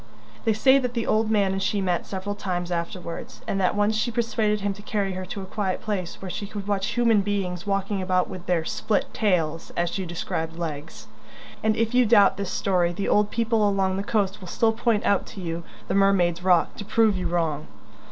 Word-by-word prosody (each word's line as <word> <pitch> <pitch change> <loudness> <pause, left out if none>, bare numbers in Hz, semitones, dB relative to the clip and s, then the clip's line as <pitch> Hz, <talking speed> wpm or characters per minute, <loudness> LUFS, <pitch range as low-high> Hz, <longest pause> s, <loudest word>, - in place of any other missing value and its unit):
They 225 - +4
say 265 +5 +5
that 250 -2 -3
the 230 - 0
old 220 0 +2
man 205 -3 +3
and 195 0 -2
she 205 +1 0
met 180 -3 -1
several 195 +1 -4
times 180 -3 -3
afterwards, 170 0 -5
and 195 - 0
that 185 - +2
once 205 +1 +2
she 220 +3 0
persuaded 220 -2 0
him 200 0 0
to 205 - -12
carry 205 -2 -1
her 185 0 -5
to 195 +1 -5
a - - -6
quiet 190 -1 -2
place 190 -5 -4
where 190 -1 -6
she 205 - -5
could 205 -1 -7
watch 200 -1 0
human 230 -3 +4
beings 195 -2 -2
walking 195 0 0
about 185 -1 +1
with 185 -2 -9
their 170 -3 +1
"split 210 +4 -1
tails," 165 -6 0
as 175 0 +1
she 190 -1 -3
described 165 -1 -3
legs. 160 -2 -6 0.6
And 215 0 +2
if 230 +1 0
you 250 -2 +4
doubt 200 -3 +5
this 200 -2 -3
story, 180 -3 +1
the 185 +3 -2
old 210 0 +3
people 225 -2 +2
along 190 -1 +1
the - - -1
coast 205 -1 0
will 185 - -9
still 225 +5 +2
point 225 -1 +1
out 200 - +2
to - - -9
you 170 -2 -3 0.3
the - - -1
"Mermaid's 185 -3 +3
Rock" 180 -2 +3
to - - -5
prove 220 -1 +3
you 185 - -2
wrong. 160 -3 -1
195 Hz, 220 wpm, -25 LUFS, 180-210 Hz, 0.6 s, say